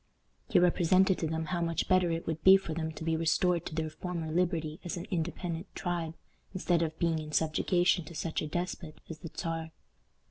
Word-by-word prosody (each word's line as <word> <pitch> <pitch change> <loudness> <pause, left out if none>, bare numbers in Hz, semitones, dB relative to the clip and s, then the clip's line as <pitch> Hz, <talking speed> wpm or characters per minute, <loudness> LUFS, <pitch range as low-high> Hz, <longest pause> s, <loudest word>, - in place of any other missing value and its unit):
He - - +4
represented 180 +2 +4
to 160 - 0
them 160 +1 -2
how 170 +2 -2
much 165 -1 -1
better 185 -2 +4
it 165 0 -2
would 160 -1 -3
be 190 +1 +9
for 190 -4 -5
them 160 0 -2
to 160 - -7
be 165 0 +1
restored 170 +1 +1
to - - -6
their 160 -1 -2
former 170 -2 -4
liberty 165 -2 0
as 175 +1 -4
an 175 - -5
independent 170 0 -3
tribe, 170 -3 -2 0.4
instead 175 -2 +1
of 160 -1 -2
being 165 -2 +1
in 155 -1 -7
subjugation 175 +3 +2
to 170 - -10
such 160 +1 -2
a 155 - -3
despot 175 -1 -4
as 160 - -8
the 165 - -7
Czar. 165 -1 -3
165 Hz, 205 wpm, -31 LUFS, 160-180 Hz, 0.4 s, be